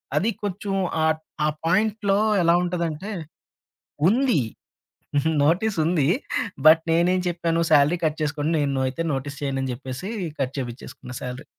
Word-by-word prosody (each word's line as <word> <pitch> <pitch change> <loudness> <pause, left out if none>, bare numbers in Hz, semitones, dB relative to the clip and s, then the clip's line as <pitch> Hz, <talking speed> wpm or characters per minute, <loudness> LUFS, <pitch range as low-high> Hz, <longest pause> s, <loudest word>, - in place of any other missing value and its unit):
అది 190 +9 +2
కొంచెం 200 0 -3 0.3
ఆట్ 160 0 +1 0.2
ఆ - - +3 0.2
పాయింట్‌లో 200 +2 +2 0.2
ఎలా 170 - +5
ఉంటదంటే 175 +2 -3 1.0
ఉంది. 245 - +3 1.0
నోటీస్సుంది. 165 -3 +2 0.6
బట్, 160 +1 +8
నేనేం 175 +3 +3
చెప్పాను 170 -1 0
సాలరీ 150 +3 +5
కట్ 155 0 0
చేసుకోండి, 150 +1 -1
నేను 140 -2 0
అయితే 130 +6 -4
నోటీస్ 140 +2 -4
చేయను 135 -1 -1
అని 130 - -2
చెప్పేసి 130 +9 -6 0.3
కట్ 130 0 -1
చేపించేసుకున్న 125 0 -7
సాలరీ. 125 +3 -6
160 Hz, 125 wpm, -24 LUFS, 140-185 Hz, 1.0 s, బట్